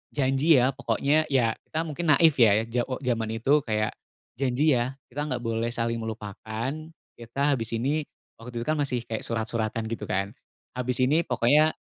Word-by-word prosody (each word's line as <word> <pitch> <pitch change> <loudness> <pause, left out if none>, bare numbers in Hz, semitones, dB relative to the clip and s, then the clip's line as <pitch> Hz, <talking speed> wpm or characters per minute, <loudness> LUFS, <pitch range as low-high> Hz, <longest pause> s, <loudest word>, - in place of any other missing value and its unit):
"Janji, 140 +3 +3
ya, 130 0 +4
pokoknya," 145 +3 +1
ya, 125 -5 +2 0.2
kita 160 +1 -2
mungkin 165 +1 -4
naif, 165 0 +5
ya, 110 -2 +5
ja 120 +1 -1
o 130 - -2
jaman 115 -3 0
itu 140 +6 +3
kayak, 110 -1 0 0.5
"janji, 140 +3 +2
ya, 125 +3 -2 0.2
kita 145 +4 -3
nggak 125 -4 -3
boleh 115 0 -1
saling 115 -1 -1
melupakan. 110 +2 -5 0.5
Kita 135 +5 -1
habis 115 -2 -2
ini," 145 +6 0 0.3
waktu 120 0 -6
itu, - - -12
kan, 155 0 +1
masih 125 -5 0
kayak 110 -1 -4
surat-suratan, 115 -1 -2
gitu, 110 -2 -4
kan, 100 +2 -1 0.4
"habis 125 0 -1
ini 155 +6 +2
pokoknya." 145 +5 +3
125 Hz, 170 wpm, -26 LUFS, 115-140 Hz, 0.5 s, naif